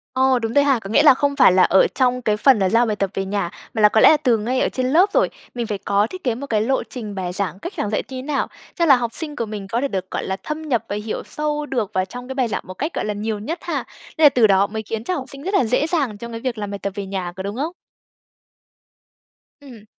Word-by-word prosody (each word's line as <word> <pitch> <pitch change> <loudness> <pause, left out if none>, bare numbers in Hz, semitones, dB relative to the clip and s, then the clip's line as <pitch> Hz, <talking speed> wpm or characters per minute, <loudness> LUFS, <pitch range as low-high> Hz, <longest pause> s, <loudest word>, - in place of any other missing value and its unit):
Ồ, 260 -1 +3
đúng 225 0 -3
rồi 285 - +5
ha. 275 -4 +3
Có 195 - -9
nghĩa 290 +7 +4
là 290 - +8
không 280 +2 0
phải 260 -9 +6
là 185 0 +5
ở 190 - +5
trong 250 -1 +2
cái 215 -3 0
phần 255 0 +5
là 190 -1 +2
giao 235 +2 +3
bài 215 -2 -1
tập 195 -1 -1
về 195 - -2
nhà, 200 -3 -2 0.2
mà 220 - -1
là 210 - +7
có 220 - +3
lẽ - - +9
là 310 - +6
từ 250 -6 +2
ngay 240 +5 -1
ở - - +2
trên 255 -1 -2
lớp 365 +6 +5
rồi. - - +3 0.3
Mình 235 -2 -3
phải 210 - -2
có 200 +2 +1
thiết 370 0 -9
kế 240 -4 0
một 280 +3 -7
cái 215 -4 +1
lộ 265 +5 0
trình 215 -5 -7
bài 185 -2 -3
giảng, 190 -2 -3
cách 345 - -6
giảng 210 - -1
dạy 215 - -1
thế 260 -1 -7
nào 280 +1 -1 0.3
cho 340 - +2
là 275 -4 +7
học 235 -2 -2
sinh 300 -3 -4
của 230 - -2
mình 205 -2 -7
có 235 +4 -1
thể 280 - +1
được, 190 -6 -4
gọi - - -2
là, 190 - -3
thâm 305 +1 -4
nhập 240 -8 -1
và 205 - -2
hiểu 220 - -4
sâu 300 0 -3
được 230 -8 -3
vào 185 -1 +1
trong 245 +6 -9
cái 265 - -6
bài 255 -3 +1
giảng 220 - -3
một 185 - -7
cách, 305 - -4
gọi - - -2
là, 210 - -1
nhiều 210 +1 -3
nhất 315 - -4
ha. - - -3 0.3
Nên 315 - +5
là - - +10
từ 235 -5 +4
đó 195 0 +4
mới 220 +1 -5
khiến 220 +1 -4
cho 365 - -2
học 265 -5 -4
sinh 275 0 -8
rất 385 +4 -3
là 265 - +4
dễ 250 +7 +1
dàng 285 - -1
trong 235 +3 -8
cái 230 - -5
việc 250 -4 -3
làm 205 -1 -4
bài 200 - -5
tập 200 - -3
về 200 - -4
nhà, 190 -2 -4
có 190 - -4
đúng 200 +2 -4
không? 295 +7 -2 1.9
Ừm. 240 -7 -13
230 Hz, 305 wpm, -21 LUFS, 205-275 Hz, 1.9 s, là